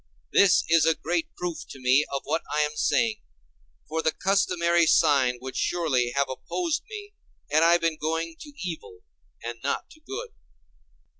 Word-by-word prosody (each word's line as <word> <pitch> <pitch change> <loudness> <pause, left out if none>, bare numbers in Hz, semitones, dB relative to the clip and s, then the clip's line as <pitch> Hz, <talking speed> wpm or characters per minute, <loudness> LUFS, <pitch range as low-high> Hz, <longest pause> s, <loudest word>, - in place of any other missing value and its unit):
This 200 -3 +5
is 165 0 +4
a 165 - +4
great 165 0 -1
proof 175 -2 -4
to 135 - -10
me 130 +3 +4
of 140 -1 -2
what 155 +3 -1
I 150 - +2
am 150 0 -1
saying, 220 +7 +1 0.7
for 160 +1 -2
the 160 - +2
customary 175 -3 +2
sign 140 -7 +4
would 130 0 -7
surely 140 -9 +1
have 140 0 +2
opposed 320 - -2
me 415 -1 -8 0.4
had 155 - +4
I 170 +1 +6
been 165 -2 -1
going 165 +2 -2
to 295 - -10 0.2
evil 155 - -8 0.4
and 120 0 -5
not 140 - -2
to 310 - -16
good. 400 +10 -7
165 Hz, 165 wpm, -26 LUFS, 140-180 Hz, 0.7 s, I